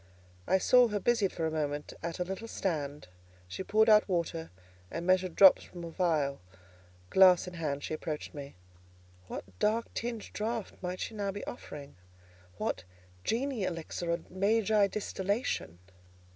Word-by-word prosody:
I 190 - +4
saw 250 +6 +6
her 210 -2 -1
busied 225 -2 +2
for 165 - -2
a 160 - 0
moment 150 -1 -2
at 170 0 -4
a 180 - 0
little 190 +5 -5
stand; 150 - -3 0.4
she 95 - -6
poured 215 +3 +3
out 215 -1 +6
water, 170 -2 -1 0.4
and 170 +1 -4
measured 185 -1 +2
drops 190 -2 +8
from 175 -1 -10
a 165 - -6
phial: 155 - 0 0.7
glass 185 -2 +6
in 180 - -7
hand, 150 -4 -3
she - - -3
approached 155 -1 -4
me. 140 -1 -8 0.7
What - - -5 0.2
dark 225 +2 +1
tinged 235 -2 -4
draught 220 0 -3
might 180 0 -4
she - - -4
now 200 -2 -2
be 205 +1 -6
offering? 145 - -8 0.6
what - - -2 0.4
Genii 255 0 -1
elixir 170 -1 -3
or 170 0 0
Magi 205 +2 +3
distillation? 200 - -2
185 Hz, 155 wpm, -31 LUFS, 160-210 Hz, 0.7 s, drops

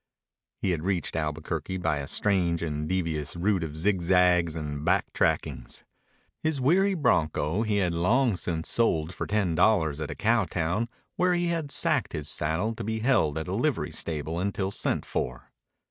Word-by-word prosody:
He 95 - +2
had 85 -3 -1
reached 90 -4 -1
Albuquerque 80 +3 -3
by 80 -4 0
a 70 - -5
strange 90 -2 +1
and 75 -1 -3
devious 80 -5 -1
route 95 +1 +1
of 80 -1 -5
zigzags 90 -2 +3
and 75 -2 -4
back 95 +3 +1
trackings. - - -1 0.6
His 155 -3 0
weary 190 +9 +3
bronco 85 - +1
he 110 -2 0
had 90 -4 +1
long 110 +7 +2
since 85 -2 -3
sold 85 -8 +1
for - - -4
ten 100 -5 +1
dollars 80 -5 +2
at 75 - -3
a - - -5
cow 115 -1 +2
town 90 +8 -1 0.3
where 180 0 +3
he 175 0 0
had 165 -4 -2
sacked 145 -1 +1
his 75 -3 -4
saddle 80 +9 -1
to - - -6
be 110 +1 -2
held 105 - +2
at 80 - -3
a - - -3
livery - - 0
stable 80 +1 -4
until 95 0 -1
sent - - -2
for. 60 0 -4
90 Hz, 175 wpm, -27 LUFS, 80-110 Hz, 0.6 s, zigzags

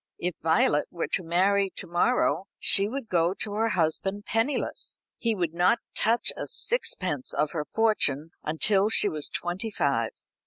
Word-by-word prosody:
If 180 +1 -2
Violet 160 -2 +2
were 170 - -3
to - - 0
marry 195 +4 +2
to - - -5
morrow, 190 +2 +1
she 200 +1 +4
would 265 -1 -5
go 175 0 +1
to 205 0 -4
her 225 +2 +1
husband 190 +3 -1
penniless. 230 +6 -2 0.2
He 230 -2 0
would 175 -4 -2
not 180 +6 +3 0.2
touch 230 +2 +1
a - - -5
sixpence 185 - -1
of 150 0 0
her 150 -3 -3
fortune 165 -8 +1
until 195 +6 +2
she 215 - +4
was 155 -6 -1
twenty 180 +6 -3
five. 140 - 0
185 Hz, 160 wpm, -27 LUFS, 165-215 Hz, 0.2 s, she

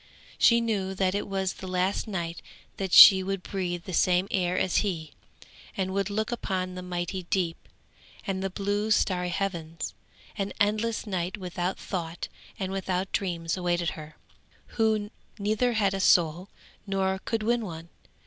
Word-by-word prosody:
She 235 0 +6
knew 200 -4 -1
that 185 -1 +1
it 205 - -2
was 190 -1 -1
the 190 - -9
last 185 +4 0
night 170 -5 -4 0.4
that 190 -2 -3
she 190 +1 +11
would 195 0 -3
breathe 175 -3 -3
the 185 - -7
same 180 +2 +3
air 180 -1 +1
as 185 - +1
he, 165 -7 -1 0.7
and 190 -1 -1
would 195 0 0
look 220 +3 -1
upon 185 -6 -2
the 180 - -6
mighty 180 +1 -3
deep, 175 -4 -1 0.6
and 190 -1 -2
the 195 - -1
blue 205 +2 -1
starry 180 -4 +2
heavens; 170 -4 -3 0.5
an 195 0 -2
endless 215 +3 +1
night 185 -1 -2
without 180 -1 -3
thought 170 -3 -5 0.3
and 190 -3 -3
without 190 -1 -2
dreams 170 -4 -1
awaited 175 -2 0
her, 155 -1 -10 0.5
who 220 -2 0 0.3
neither 215 +4 +1
had 200 -3 +2
a 195 - -2
soul, 175 0 +3 0.4
nor 190 -1 0
could 225 -2 -1
win 235 +1 +1
one. 165 -4 -7
190 Hz, 160 wpm, -27 LUFS, 180-200 Hz, 0.7 s, she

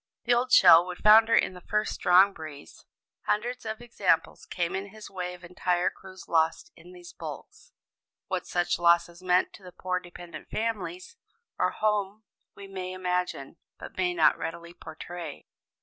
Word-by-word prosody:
The 245 - +2
old 250 +2 0
shell 165 -7 +8
would 180 -1 -6
founder 220 +2 +6
in - - +2
the 180 - -12
first 210 +3 -1
strong 185 +3 +5
breeze. 155 -4 -11 0.4
Hundreds 240 +2 -1
of 220 +1 -5
examples 240 - 0
came 175 0 -2
in 195 +1 -4
his 215 +1 -12
way 180 -1 -5
of 180 - -18
entire 180 0 0
crews 190 -1 -13
lost 165 - +1
in 360 - -15
these 355 -1 -13
hulks. - - -9 0.5
What - - -4
such 175 -1 0
losses 170 0 +2
meant 180 0 +2
to 200 - -15
the 180 - -11
poor 180 0 -3
dependent 175 -2 -11
families 285 - -4 0.4
at - - +1
home 210 0 -1 0.3
we 200 - -10
may 185 -1 -6
imagine, 180 -5 -3 0.2
but - - -10
may 180 -1 0
not 160 -1 +4
readily 170 +1 -6
portray. 160 -1 -9
185 Hz, 165 wpm, -27 LUFS, 175-215 Hz, 0.5 s, shell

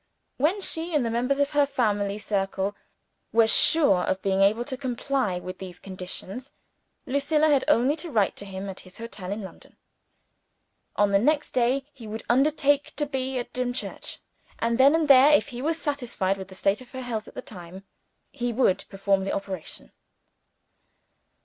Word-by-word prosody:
When 335 +10 +1
she 325 -2 -3
and 280 -5 +2
the 230 - -1
members 250 +4 0
of 285 0 +2
her 290 -1 +3
family 205 -6 0
circle 195 -1 -2 0.6
were 230 0 +5
sure 220 - +5
of 190 +1 -1
being 195 0 +1
able 215 +5 +3
to 265 - -4
comply 255 -5 -1
with 185 +1 -7
these 185 -2 -8
conditions, 190 +7 -8 0.5
Lucilla 300 +3 +2
had 280 -3 +3
only 255 +6 +3
to 330 +2 -7
write 215 -8 +1
to 200 - -7
him 195 0 -6
at 190 -1 -7
his 185 -1 -14
hotel 205 -5 -7
in 205 +1 -4
London. 190 - -12 1.2
On 205 -1 +3
the 195 - +4
next 295 +6 +1
day 255 +2 +1
he 240 -6 -11
would 220 +1 -6
undertake 285 +2 +2
to 295 - -1
be 265 -2 -3
at 245 - -5
Dimchurch. 250 0 -3 0.4
And 230 +1 0
then 280 +4 +7
and 325 -2 +1
there 275 +1 +8
(if 295 - +3
he 245 -2 -6
was 320 +3 -1
satisfied 245 - -1
with 190 -1 -8
the 190 - -13
state 195 +4 +1
of 250 - -13
her 260 - -5
health 225 -3 -4
at - - -14
the - - -5
time), 185 -1 -10 0.5
he 245 -3 -2
would 230 -5 +2
perform 195 0 0
the 195 - -2
operation. 195 -4 -6
240 Hz, 180 wpm, -26 LUFS, 195-275 Hz, 1.2 s, there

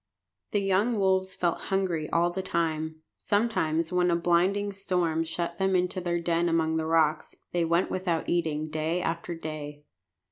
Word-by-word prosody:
The 205 - 0
young 200 +4 +2
wolves 190 -1 +1
felt 170 -2 0
hungry 185 -5 0
all 170 +1 +2
the 190 +2 -3
time. 160 -3 -2
Sometimes, 170 -7 0
when 180 0 +3
a 170 - +3
blinding 180 +4 +2
storm 180 -4 0
shut 170 +2 -4
them 190 0 +2
into 180 0 0
their 175 -1 -1
den 170 0 +1
among 160 -1 +1
the 160 0 -1
rocks, 160 -2 +1 0.2
they 175 -1 +1
went 170 +2 +1
without 180 -3 -1
eating 155 -3 -1
day 160 +3 -1
after 170 0 -3
day. 150 -2 -7
170 Hz, 165 wpm, -28 LUFS, 160-185 Hz, 0.2 s, when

